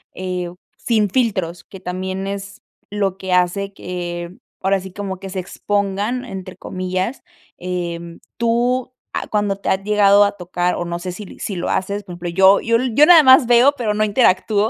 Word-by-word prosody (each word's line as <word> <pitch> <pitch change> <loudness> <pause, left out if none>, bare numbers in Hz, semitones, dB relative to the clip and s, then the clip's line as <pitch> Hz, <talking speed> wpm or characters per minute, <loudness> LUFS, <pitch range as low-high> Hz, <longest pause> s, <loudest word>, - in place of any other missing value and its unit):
eh, 180 -1 -3 0.3
sin 215 -4 +1
filtros, 190 -9 -1
que 190 - -12
también 185 +1 -4
es 200 +1 -6 0.3
lo 195 -2 -1
que 190 -1 -3
hace 180 +2 +1
que 175 -2 -5 0.3
ahora 195 +1 +2
sí, 190 0 -9
como 190 -1 -5
que 195 0 -8
se 190 0 -4
"expongan" 205 +6 -2
entre 190 -5 -8
comillas, 185 +6 -3 0.4
em, 170 -2 -5 0.2
tú 240 +2 +1 0.2
ah, - - -3
¿cuándo 205 -2 0
te 200 - -9
ha - - +4
llegado 205 -1 +5
a 200 - +2
tocar? 180 0 -1
O 175 - -3
no 170 0 -3
sé 180 +1 -5
si 195 +2 -10
si 200 - -4
lo 175 - -3
haces, 200 +2 -1
por 185 -3 -9
ejemplo, 175 0 -5
yo 190 +3 +5
yo 230 0 +2 0.2
yo 295 +5 +7
nada 335 -2 +9
más 260 -1 +7
veo, 245 +4 +5
pero 220 -4 -1
no 215 0 +1
interactúo, 210 -1 +2
195 Hz, 185 wpm, -19 LUFS, 180-210 Hz, 0.4 s, nada